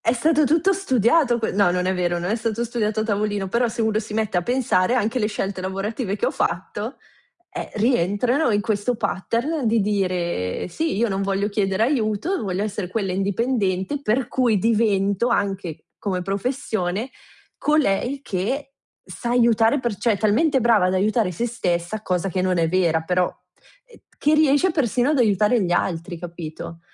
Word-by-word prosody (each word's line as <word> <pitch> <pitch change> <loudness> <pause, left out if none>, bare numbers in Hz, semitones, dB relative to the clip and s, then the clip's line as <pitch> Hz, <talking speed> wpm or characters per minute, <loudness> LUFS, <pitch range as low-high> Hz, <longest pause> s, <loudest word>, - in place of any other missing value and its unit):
É 230 - +2
stato 305 +4 +2
tutto 330 +7 +3
studiato 260 - +2
que 220 - -1
no, 195 -2 +3
non 180 0 0
è 190 - +1
vero, 175 -1 0
non 175 +3 -2
è 220 - +1
stato 230 0 -2
studiato 220 -2 -1
a - - +1
tavolino, 205 -2 -1
però 235 +4 +1
se 225 +1 -3
uno 220 -1 +1
si 215 -1 -6
mette 215 -3 -1
a 175 - +2
pensare 245 -3 +1
anche 240 +1 0
le 210 - +1
scelte 195 -3 -3
lavorative 195 +3 -3
che 210 - -1
ho - - +1
fatto, 205 +7 -3 0.5
eh, - - -6
rientrano 235 - +1
in 205 -1 +2
questo 215 +3 -1
pattern 235 - -2
di 225 0 +3
dire: 180 - -1
"Sì, 320 - -2
io 235 +2 +1
non 195 -1 -1
voglio 195 +1 0
chiedere 200 0 0
aiuto, 245 - 0
voglio 190 +1 -2
essere 205 -3 -3
quella 195 -2 -2
indipendente, 200 +3 -1
per 240 +2 0
cui 245 -6 +2
divento, 210 0 +1
anche 195 -7 -2
come 185 -3 -2
professione, 205 +1 -2 0.5
colei 275 -2 +1
che 270 +8 -3 0.3
sa 240 - -6
aiutare 235 +1 +3
per 235 -5 -2
cioè 230 +2 +1
è 200 - -5
talmente 265 +6 +2
brava 225 -5 +4
ad 185 - 0
aiutare 205 0 +1
se 235 +8 -2
stessa, 195 -2 -2
cosa 180 0 -1
che 185 0 -1
non 185 -1 +1
è 165 -1 +2
vera, 170 -3 +2
però, 180 +2 +1
uhm, - - -17 0.2
che 300 +2 +3
riesce 305 +4 +4
persino 250 -4 +1
ad 295 - +1
aiutare 210 +1 +3
gli 175 - 0
altri", 175 0 -1
capito? 170 -1 -8
215 Hz, 180 wpm, -22 LUFS, 190-245 Hz, 0.5 s, brava